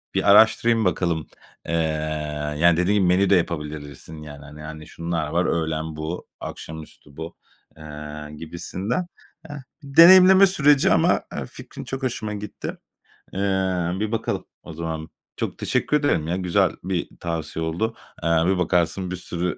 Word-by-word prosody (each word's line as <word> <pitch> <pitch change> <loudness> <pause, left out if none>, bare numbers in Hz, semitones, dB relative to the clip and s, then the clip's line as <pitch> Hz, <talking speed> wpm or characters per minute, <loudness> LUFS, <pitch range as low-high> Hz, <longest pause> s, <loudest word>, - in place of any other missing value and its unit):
bir 100 - +4
araştırayım 110 +2 +5
bakalım, 85 -3 0 0.4
eee, 85 - -2 0.9
yani, 85 0 +5
dediğin 95 +4 +2
gibi 95 -3 +3
menü 95 +2 +3
de 100 - +6
yapabilirsin 75 -2 -4
yani, 75 -1 -10
hani 75 +1 -11
hani, 75 0 -9
şunlar 85 -2 -3
var, 85 +3 0
öğlen 80 -1 -1
bu, 80 +3 -5
akşamüstü 75 -2 -9
bu, 80 +1 -7 0.4
eee, 75 0 -8
gibisinden. 95 - -4 0.4
Eee, 145 - -6 0.3
deneyimleme 185 +6 +8
süreci 150 -6 +4
ama, - - +3
eee, - - -3
fikrin - - -10
çok 135 0 -6
hoşuma 110 -4 -2
gitti. 105 0 -6 0.6
Eee, 95 - -4 0.6
bir 110 0 -2
bakalım 115 - -2 0.2
o - - -9
zaman. 80 -1 -5 0.3
Çok - - -3
teşekkür 150 - +1
ederim 140 - 0
ya. 85 - 0
Güzel 90 -2 +2
bir 90 -1 -2
tavsiye 80 -1 -3
oldu. 110 +8 -2 0.3
Eee, 85 - +1 0.2
bir 95 +1 +2
bakarsın 90 +1 0
bir - - -2
sürü 90 0 -3
85 Hz, 145 wpm, -23 LUFS, 80-105 Hz, 0.9 s, deneyimleme